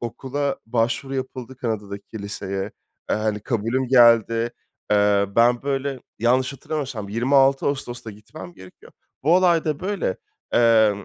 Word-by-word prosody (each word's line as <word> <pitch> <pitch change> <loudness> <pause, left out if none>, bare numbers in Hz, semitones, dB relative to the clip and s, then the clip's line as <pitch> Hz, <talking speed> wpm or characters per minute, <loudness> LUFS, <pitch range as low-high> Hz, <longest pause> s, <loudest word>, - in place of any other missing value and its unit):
okula 135 +4 -3
başvuru 120 +4 -1
yapıldı 130 -1 -5
Kanada'daki 105 -3 -5
liseye. 100 -1 -4 0.5
Eee, - - +2
hani, 110 -1 -1
kabulüm 120 +3 -1
geldi. 115 -2 +5 0.4
Eee, 100 -1 +3
ben 120 +1 +4
böyle 135 -1 -2 0.2
yanlış 130 +4 +2
hatırlamıyorsam 135 -8 -5
26 135 +5 +3
Ağustos'ta 120 -5 -3
gitmem 110 +12 -11
gerekiyor. 95 -7 -15 0.3
Bu 160 +5 +4
olay 175 -3 +3
da 150 -2 -2
böyle, 205 - -2 0.4
emm, 110 -4 +4
120 Hz, 125 wpm, -23 LUFS, 110-135 Hz, 0.5 s, geldi